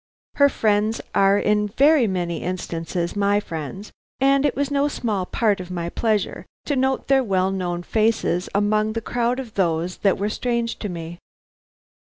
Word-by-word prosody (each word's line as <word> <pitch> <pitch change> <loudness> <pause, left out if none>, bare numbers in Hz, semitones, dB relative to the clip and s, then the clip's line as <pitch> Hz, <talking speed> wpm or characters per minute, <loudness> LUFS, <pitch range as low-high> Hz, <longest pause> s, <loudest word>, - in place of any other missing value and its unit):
Her 280 0 +6
friends 215 -2 +1
are 195 +1 +4
in 210 0 +1
very 275 +4 +4
many 175 -4 -2
instances 170 -1 -3
my 205 0 +2
friends, 170 +2 -7 0.3
and 275 +1 +4
it 280 - -2
was 285 +1 -1
no 285 0 +2
small 210 -9 -2
part 210 -4 +1
of 180 -1 -7
my 170 -2 -3
pleasure 215 +1 -1 0.2
to 290 - 0
note 265 0 0
their 270 -1 +4
well 190 -3 +1
known 175 -2 -3
faces 215 -4 0
among 215 +1 +2
the 230 - -1
crowd 240 +2 -1
of 240 -5 -7
those 175 -1 0
that 195 -2 +2
were 205 +2 -1
strange 235 +1 -2
to 210 - -4
me. 170 -1 -7
205 Hz, 170 wpm, -22 LUFS, 180-235 Hz, 0.3 s, Her